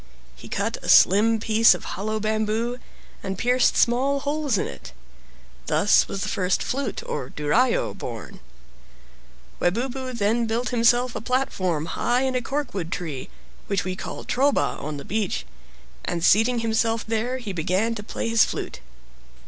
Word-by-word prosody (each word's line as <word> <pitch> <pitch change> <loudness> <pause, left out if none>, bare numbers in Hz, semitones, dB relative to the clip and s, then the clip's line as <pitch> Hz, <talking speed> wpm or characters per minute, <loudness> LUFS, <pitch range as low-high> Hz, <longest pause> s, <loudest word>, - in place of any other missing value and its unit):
He 65 - -12
cut - - -2
a - - -6
slim 220 +4 +6
piece 220 -2 +5
of - - -9
hollow 215 +3 -3
bamboo, 220 +3 -1 0.4
and 195 -1 -4
pierced 250 +4 +2
small 270 +4 +2
holes 290 -4 0
in - - 0
it. - - -9 0.7
Thus 205 - +4
was 195 0 -4
the - - -3
first 185 -1 0
flute 265 -4 -3
(duraio) 150 - 0
born. - - -8 1.2
Webubu 255 +7 -1
then 230 +2 +1
built 235 +3 -1
himself 240 0 +3
a - - -3
platform 185 - -1
high 240 +9 0
in 265 -1 0
a 255 - 0
corkwood 245 - -3
tree, 150 -9 -5 0.4
which 200 -2 0
we 185 0 -3
call - - -7
"troba" 275 +3 +1
on 150 0 -4
the 140 - -8
beach, 215 +1 -2 0.6
and 170 -1 -1
seating 230 +3 +4
himself 225 0 0
there 230 +3 -1
he 225 -6 -6
began 185 +7 0
to 220 - -5
play 210 - -4
his 230 -1 +5
flute. - - -4
225 Hz, 150 wpm, -24 LUFS, 190-245 Hz, 1.2 s, slim